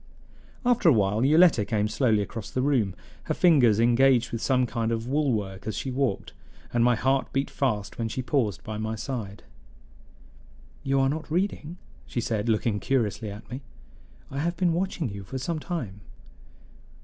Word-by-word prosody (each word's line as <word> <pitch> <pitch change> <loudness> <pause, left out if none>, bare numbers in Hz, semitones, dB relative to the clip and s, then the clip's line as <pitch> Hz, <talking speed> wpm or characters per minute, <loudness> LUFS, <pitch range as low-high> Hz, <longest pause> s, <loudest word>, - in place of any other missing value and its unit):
After 245 -8 +4
a - - +6
while 105 +1 +2
Yoletta 155 -4 +5
came 105 0 0
slowly 110 -2 +2
across 110 +1 -7
the 130 - -1
room, 120 -10 +1 0.3
her - - -1
fingers 130 - +5
engaged 120 +1 +4
with 115 - -3
some 130 -2 +2
kind 115 -1 -2
of 115 0 -2
wool 145 +1 +1
work 100 -4 -3
as 110 - -3
she 130 - -3
walked, 130 -5 -1 0.4
and 120 -1 +3
my 120 0 +4
heart 135 +3 0
beat 135 +1 -1
fast 105 -7 -2
when 115 - 0
she 130 +3 -3
paused 120 - 0
by 110 -1 -5
my 110 +1 -2
side. 110 -5 -5 1.4
"You 135 0 +1
are 135 - +3
not 155 +3 -3
reading," 175 -1 -2 0.3
she - - -3
said, 115 -1 -1
looking 110 -1 +1
curiously 115 -4 -1
at 100 +1 -9
me. 130 +3 -5 0.7
"I 135 - -3
have 170 +3 -1
been 175 -2 +2
watching 175 -3 -1
you 100 -2 -7
for 130 +7 -6
some 155 +5 -3
time." 125 - -5
125 Hz, 175 wpm, -26 LUFS, 110-140 Hz, 1.4 s, a